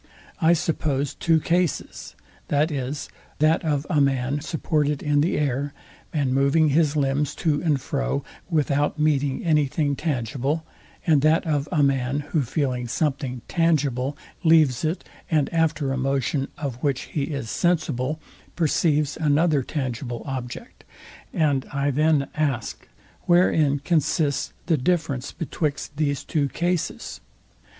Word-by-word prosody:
I 165 +1 +5
suppose 155 -5 -1
two 165 -1 +2
cases, 175 -1 -1 0.3
viz. 145 -2 -1 0.3
that 155 +2 +3
of 150 -2 0
a 150 - +2
man 135 0 +1
supported 150 -2 -1
in 145 -1 +2
the 165 - +1
air, 140 0 -1 0.4
and 140 -5 0
moving 140 +4 +3
his 150 0 +2
limbs 145 0 0
to 150 -3 0
and 155 -5 +1
fro, 140 +1 -2 0.3
without 145 -2 +1
meeting 145 -2 +1
any 150 -3 +3
thing 145 0 0
tangible; 140 +2 -2 0.4
and 155 -4 +4
that 155 +3 +3
of 150 -2 0
a 155 -5 +3
man, 135 0 +1
who 155 - +2
feeling 125 -2 -1
something 130 -2 -2
tangible, 145 -5 +1 0.3
leaves 155 -6 +4
it, 160 +4 -1 0.3
and 155 -2 +1
after 160 -4 +1
a - - -2
motion, 135 +1 0
of 130 -4 -5
which 140 -3 0
he 145 -3 0
is 140 -7 -4
sensible, 155 -5 0 0.4
perceives 150 -2 +1
another 155 -1 +3
tangible 125 -3 -4
object; 130 -3 -6 0.5
and 145 -5 +1
I 140 0 0
then 150 0 +2
ask, 140 -7 -2 0.4
wherein 160 -5 +4
consists 150 -1 0
the 165 -3 +2
difference 145 -3 -1
betwixt 150 -3 -3
these 145 -2 0
two 145 -3 0
cases? 175 +3 -2
145 Hz, 130 wpm, -24 LUFS, 135-155 Hz, 0.5 s, I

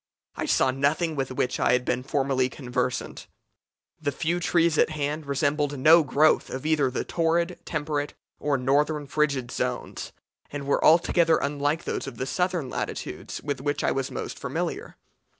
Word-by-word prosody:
I - - -3
saw 130 - +3
nothing 150 +5 0
with 135 -2 -2
which 130 0 -1
I - - +3
had 125 0 +1
been 125 -1 0
formerly 135 -1 0
conversant. 125 -2 -3 0.7
The 145 -2 0
few 170 +5 -1
trees 170 -2 +2
at - - +4
hand 150 0 -3
resembled 145 +1 0
no 160 +6 +7
growth 150 +2 +3
of 130 +2 -6
either 150 -4 +2
the 125 - -2
torrid, 170 +1 0
temperate, 150 -2 -2 0.2
or 145 -2 +1
northern 145 +3 +1
frigid 140 -4 0
zones, - - -3 0.4
and 145 -1 -6
were 140 - +1
altogether 165 0 +5
unlike 145 +3 -1
those - - -3
of 120 - -7
the 130 - -2
southern 180 -1 -1
latitudes - - -5
with 145 -3 -3
which 145 +1 -1
I - - +2
was 135 -1 -1
most - - -6
familiar. - - -4
145 Hz, 165 wpm, -26 LUFS, 135-155 Hz, 0.7 s, no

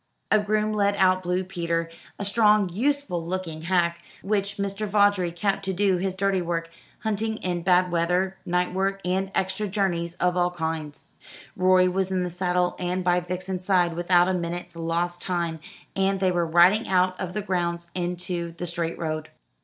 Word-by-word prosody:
A 215 - +6
groom 215 +1 0
led 200 -1 +2
out 185 -1 +3
Blue 180 +1 -1
Peter, 170 -2 -2 0.3
a 200 - -3
strong 210 -1 +4
useful 250 -2 -1
looking 170 -2 -4
hack, 170 0 +1 0.2
which 200 0 -1
Mr. 200 +1 -2
Vawdrey 200 -3 +3
kept 195 +3 -1
to 190 - -1
do 190 0 +2
his 190 +1 -2
dirty 195 -1 +1
work, 165 -1 -3 0.3
hunting 220 0 -1
in 175 -3 -2
bad 180 0 +3
weather, 180 +3 +1
night 180 0 0
work, 195 +1 0
and 190 +2 0
extra 190 +2 -1
journeys 175 -4 -1
of 180 0 +1
all 175 0 +2
kinds. 160 -3 -5 0.4
Rorie 185 -1 +4
was 190 +1 0
in 185 -1 0
the 180 - -3
saddle 180 0 0
and 180 +1 -1
by 180 0 +3
Vixen's 180 +1 -4
side 180 -3 +2
without 175 +1 +3
a 190 - +1
minute's 175 -1 -4
lost 170 +1 -2
time, 170 -3 -2 0.4
and 195 0 +1
they 185 -1 +2
were 175 -1 0
riding 175 +7 +5
out 185 -1 +2
of 180 -1 -4
the 210 - -3
grounds 170 -3 -2
into 175 -1 -3
the 175 - -4
straight 170 -1 -3
road. 155 -1 -3
180 Hz, 175 wpm, -25 LUFS, 175-195 Hz, 0.4 s, A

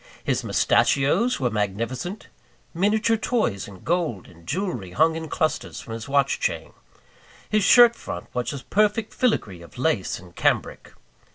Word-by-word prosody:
His - - 0
mustachios 170 - +2
were 125 -3 0
magnificent; 115 - -3 0.5
miniature 215 +5 +2
toys 220 - -1
in 95 -3 -13
gold 165 - -1
and 85 -1 -18
jewellery 140 - -3
hung 160 - +3
in 160 -1 -5
clusters 155 -1 -2
from 115 - -8
his 115 +4 -7
watch 140 0 +2
chain; - - -2 0.7
his 215 -1 +1
shirt 240 +2 +7
front - - -7
was 125 -1 -2
a 140 -3 -7
perfect 215 +1 +1
filigree 105 - 0
of 85 - -14
lace 125 - 0
and 90 -1 -15
cambric. - - -1
145 Hz, 150 wpm, -24 LUFS, -, 0.7 s, shirt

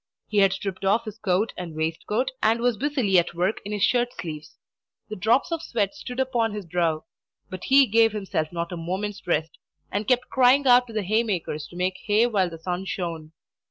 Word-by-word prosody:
He 210 - +1
had 195 -1 +5
stripped 195 0 -5
off 215 +4 +2
his 215 0 -8
coat 200 +1 0
and 175 -3 -7
waistcoat, 165 +11 -1
and 225 +2 +3
was 245 0 +1
busily 255 -8 +2
at 170 - -2
work 180 +5 0
in 205 - -6
his 205 -2 -1
shirt 245 -1 +2
sleeves. 155 -3 -7 0.5
The 215 - -5
drops 225 - +2
of 330 -1 -1
sweat 210 -9 -1
stood 255 -4 -7
upon 235 -5 0
his 205 -3 -6
brow; 165 -2 0 0.5
but 185 -1 -6
he 275 +1 +6
gave 225 0 +4
himself 195 -7 -2
not 170 0 -4
a 175 - -4
moment's 190 +4 -4
rest, 160 -2 -1 0.3
and 205 +2 -2
kept 250 0 +2
crying 265 +2 +4
out 250 -1 +6
to 230 - -10
the 215 -1 -1
haymakers 190 -7 -1
to - - -15
make 185 +1 -1
hay 215 +2 +4
while 200 -7 +1
the 165 - -9
sun 180 +3 -4
shone. 165 -5 -5
205 Hz, 205 wpm, -25 LUFS, 175-235 Hz, 0.5 s, he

